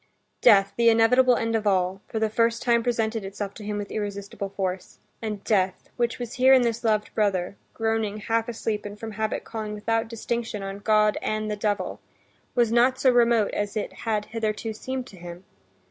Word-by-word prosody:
Death, 200 -4 +6
the 235 0 +5
inevitable 245 +3 +5
end 225 0 -1
of 215 -1 0
all, 190 0 +1
for - - -5
the 220 0 +2
first 230 +1 +1
time 235 -1 +3
presented 225 -2 -1
itself 200 +1 -5
to 215 - -10
him 210 0 -3
with 205 -1 -5
irresistible 200 -1 -4
force. 190 -1 -4 0.2
And 210 -3 -4
death, 190 -3 0
which 240 -1 0
was 245 -1 -6
here 260 0 +5
in 260 -2 +6
this 235 -1 -1
loved 215 -2 +1
brother, 200 -3 0 0.2
groaning 225 -2 -1
half 225 +2 -1
asleep 220 -2 -3
and 205 0 -8
from 225 -1 -6
habit 215 +1 -2
calling 215 -2 -5
without 225 +2 -1
distinction 230 -2 -3
on 195 0 -5
God 215 0 +3
and 215 0 -2
the - - -1
devil, 205 0 -2 0.6
was 235 -2 +3
not 250 +2 +3
so 260 -1 +5
remote 235 -3 +3
as 205 +1 -2
it 210 - -3
had 215 -2 -2
hitherto 220 0 -3
seemed 260 +3 -5
to 200 - -14
him. 175 +1 -9
220 Hz, 190 wpm, -25 LUFS, 205-230 Hz, 0.6 s, Death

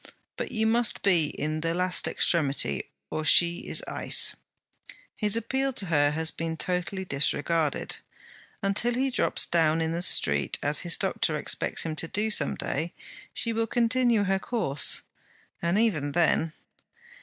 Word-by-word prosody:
But - - -5
you 220 -1 0
must 230 +1 +1
be 175 -5 +3
in 155 +1 -4
the 165 +1 -2
last 180 0 +2
extremity, 140 - 0 0.2
or 155 - -3
she 170 +3 +4
is - - -1
ice. - - +1 0.8
His 210 0 +2
appeal 265 +4 -1
to 200 - 0
her 145 -4 +2
has 160 +2 0
been 165 0 -5
totally 180 +3 -2
disregarded. 150 +1 -1 0.7
Until 210 +5 +1
he 265 +1 0
drops - - +2
down 160 -1 +1
in 160 0 -1
the 170 +1 -3
street, 70 - +3
as 145 +1 +2
his 175 -2 +1
doctor - - -1
expects - - -1
him 160 -1 -4
to 165 - -3
do 215 +5 -1
some - - +2
day, 165 +2 -4 0.4
she 230 - +2
will 225 0 -1
continue 240 -1 +2
her 195 0 0
course; 190 - +1 0.6
and 170 +3 0
even 155 -11 0
then...' 165 -1 +1
175 Hz, 155 wpm, -26 LUFS, 155-220 Hz, 0.8 s, she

